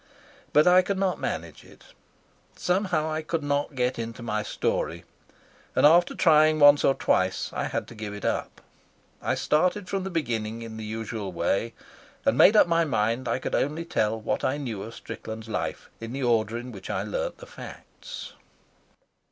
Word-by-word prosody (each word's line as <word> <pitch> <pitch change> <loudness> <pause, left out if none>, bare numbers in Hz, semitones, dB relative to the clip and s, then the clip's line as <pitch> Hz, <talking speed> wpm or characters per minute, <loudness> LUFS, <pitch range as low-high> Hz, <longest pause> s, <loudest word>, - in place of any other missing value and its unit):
But 150 - +5
I 180 +1 +7
could 195 +2 -2
not 190 -1 0
manage - - -4
it. - - -18 0.6
Somehow 180 -4 0
I 155 0 -1
could 160 0 -3
not 145 0 -1
get 125 -1 0
into 115 +1 -5
my 105 -2 -1
story, - - -2 0.7
and - - +4
after 170 +4 +5
trying 155 -2 +5
once 145 -1 +7
or 135 - +4
twice 95 0 0
I - - -2
had - - -3
to - - -11
give 105 -2 -6
it 100 - -7
up; - - -2 0.6
I - - 0
started 180 +5 +1
from 195 0 -2
the 190 - -3
beginning 115 - -2
in 110 -1 -8
the 110 - -6
usual 110 -2 -4
way, 100 +6 -1 0.5
and - - +3
made 210 - +7
up - - +7
my 170 -1 +2
mind 120 -3 0
I - - +1
could 130 - -5
only 155 +4 0
tell 110 -9 0
what 110 - -2
I 135 - +1
knew 120 -9 -4
of 115 +3 -8
Strickland's 110 0 -8
life 110 - -4
in 115 +1 -7
the 135 0 -3
order 115 -2 +1
in 125 +1 -7
which 95 -4 -10
I 100 -2 -1
learnt 105 - -3
the - - -11
facts. - - -10
125 Hz, 185 wpm, -26 LUFS, 110-160 Hz, 0.7 s, I